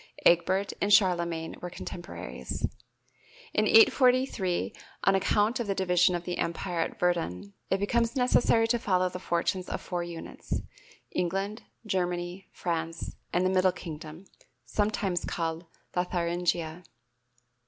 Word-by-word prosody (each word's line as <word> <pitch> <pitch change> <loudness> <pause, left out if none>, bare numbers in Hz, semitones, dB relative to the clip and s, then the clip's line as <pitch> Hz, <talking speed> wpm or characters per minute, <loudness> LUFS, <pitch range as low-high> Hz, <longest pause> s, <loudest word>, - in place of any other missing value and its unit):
(Egbert 185 +3 +4
and 205 - +1
Charlemagne 170 -5 +3
were 180 - -4
contemporaries.) 175 +1 -5 0.9
In - - +3
843, 255 - +4 0.3
on 195 - +5
account 210 +4 +2
of 235 - -2
the 195 - 0
division 180 -1 +3
of 175 - -3
the 175 0 -4
Empire 170 +1 -2
at 165 - -1
Verdun, 100 - -1 0.2
it 190 - +2
becomes 230 +5 +1
necessary 245 -3 +4
to 240 0 +2
follow 185 -4 +2
the 180 - -6
fortunes 180 +1 -1
of - - -2
four 175 -1 -3
units, 170 -1 -5 0.5
England, 195 +5 -1 0.2
Germany, 180 -1 -2
France 165 -1 -3 0.2
and 180 +1 +2
the 185 - +3
"Middle 185 0 +4
Kingdom," 165 0 -8 0.4
sometimes 205 -4 0
called 165 0 -3 0.3
Lotharingia. 175 -1 -1
180 Hz, 125 wpm, -29 LUFS, 170-195 Hz, 0.9 s, on